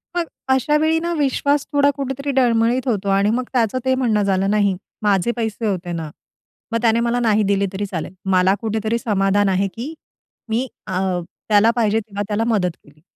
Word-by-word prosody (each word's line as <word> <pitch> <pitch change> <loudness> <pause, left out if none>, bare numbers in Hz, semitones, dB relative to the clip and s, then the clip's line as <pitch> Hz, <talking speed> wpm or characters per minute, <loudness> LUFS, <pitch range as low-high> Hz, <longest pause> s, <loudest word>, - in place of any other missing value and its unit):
मग 345 -1 0 0.2
अशा 265 +3 +3
वेळी 320 +1 +2
ना 340 +1 -2
विश्वास 285 0 +1
थोडा 285 -1 +4
कुठेतरी 275 0 -3
डळमळीत 240 +1 +2
होतो. 205 -4 0
आणि 195 +1 +3
मग 245 +3 0
त्याचं 235 -1 +1
ते 260 0 +3
म्हणणं 235 -5 +1
झालं, 195 0 +1
"नाही 205 -2 +2 0.3
माझे 205 +1 +2
पैसे 225 0 -2
होते 180 -3 -2
ना. 165 -2 -4 0.6
मग 230 0 0
त्याने 230 -1 +3
मला 235 +1 +1
नाही 220 -3 +2
दिले 200 0 +2
तरी 200 +2 -2
चालेल. 180 -2 -5 0.2
मला 185 +1 +4
कुठेतरी 220 0 -1
समाधान 200 -2 +1
आहे, 190 +1 +1
की 255 +8 -6 0.6
मी 235 +4 0 0.2
अ, 185 -1 -1 0.5
त्याला 215 +2 +5
पाहिजे 220 -2 +2
तेव्हा 205 -2 -5
त्याला 210 +1 0
मदत 200 -6 +1
केली." 145 +1 -22
220 Hz, 180 wpm, -20 LUFS, 200-250 Hz, 0.6 s, त्याला